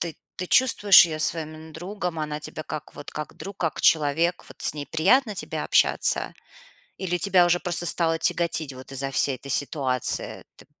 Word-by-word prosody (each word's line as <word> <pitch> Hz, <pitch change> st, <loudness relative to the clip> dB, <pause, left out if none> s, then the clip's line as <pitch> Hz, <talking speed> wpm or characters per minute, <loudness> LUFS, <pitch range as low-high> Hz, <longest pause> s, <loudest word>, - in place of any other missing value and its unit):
ты 170 Hz, -2 st, -5 dB, 0.2 s
ты 185 Hz, -, -5 dB
чувствуешь 205 Hz, -7 st, +6 dB
её 155 Hz, -1 st, -6 dB
своим 155 Hz, -1 st, -1 dB
именно 160 Hz, 0 st, -13 dB
другом, 180 Hz, 0 st, -5 dB
она 150 Hz, -1 st, -4 dB
тебя 155 Hz, +1 st, -8 dB
как 155 Hz, +1 st, -7 dB
вот 145 Hz, -, -11 dB
как 150 Hz, 0 st, -7 dB
друг, 195 Hz, 0 st, -9 dB
как 165 Hz, -3 st, -3 dB
человек, 160 Hz, +3 st, +1 dB
вот -, -, -16 dB
с -, -, +1 dB
ней 145 Hz, -1 st, -6 dB
приятно 205 Hz, -, +1 dB
тебе -, -, -5 dB
общаться? -, -, +2 dB, 0.6 s
Или 180 Hz, -2 st, -2 dB
тебя 180 Hz, 0 st, +4 dB
уже 175 Hz, 0 st, +2 dB
просто 175 Hz, -1 st, +1 dB
стало 165 Hz, 0 st, +3 dB
тяготить 165 Hz, -3 st, 0 dB
вот 130 Hz, +1 st, -12 dB
из-за 135 Hz, 0 st, -3 dB
всей 135 Hz, 0 st, +1 dB
этой 135 Hz, +2 st, -9 dB
ситуации? 135 Hz, -3 st, -1 dB
Т -, -, -18 dB
160 Hz, 185 wpm, -24 LUFS, 150-175 Hz, 0.6 s, чувствуешь